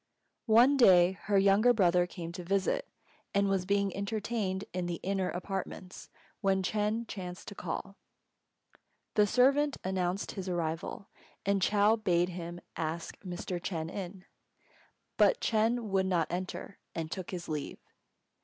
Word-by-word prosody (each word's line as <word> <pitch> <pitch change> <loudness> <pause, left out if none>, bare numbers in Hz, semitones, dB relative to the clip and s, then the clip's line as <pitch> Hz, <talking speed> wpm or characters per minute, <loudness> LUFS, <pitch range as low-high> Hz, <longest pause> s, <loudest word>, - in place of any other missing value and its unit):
One 245 +6 +6
day 185 -7 +7
her 200 0 +3
younger 200 +5 +5
brother 180 -4 +3
came 170 -2 -7
to 180 +1 -7
visit 200 - 0
her, - - -39 0.5
and 200 0 +3
was 190 -2 0
being 200 -1 +1
entertained 200 -1 -2
in 180 -1 -2
the 175 -1 -3
"inner" 190 -1 0
apartments 185 0 -5 0.3
when 190 -1 +1
Ch'êng 215 +3 0
chanced 180 -3 -7
to - - -8
call. - - -5 1.2
The 210 -1 +4
servant 275 +5 +3
announced 185 0 -1
his 190 -2 -5
arrival, 165 +2 -3 0.4
and 200 0 +2
Chou 210 +3 +4
bade 180 -4 +2
him 175 -1 -6
ask 165 +1 -4
Mr. 180 -1 -5
Ch'êng 165 -3 -3
in. 190 -1 -6 0.9
But - - +5
Ch'êng 230 +2 +1
would 195 -3 +1
not 175 -4 +1
enter, 185 +2 -5 0.2
and 160 -1 -4
took 185 0 -5
his 175 -2 -5
leave. 150 -2 -4
190 Hz, 145 wpm, -31 LUFS, 175-205 Hz, 1.2 s, day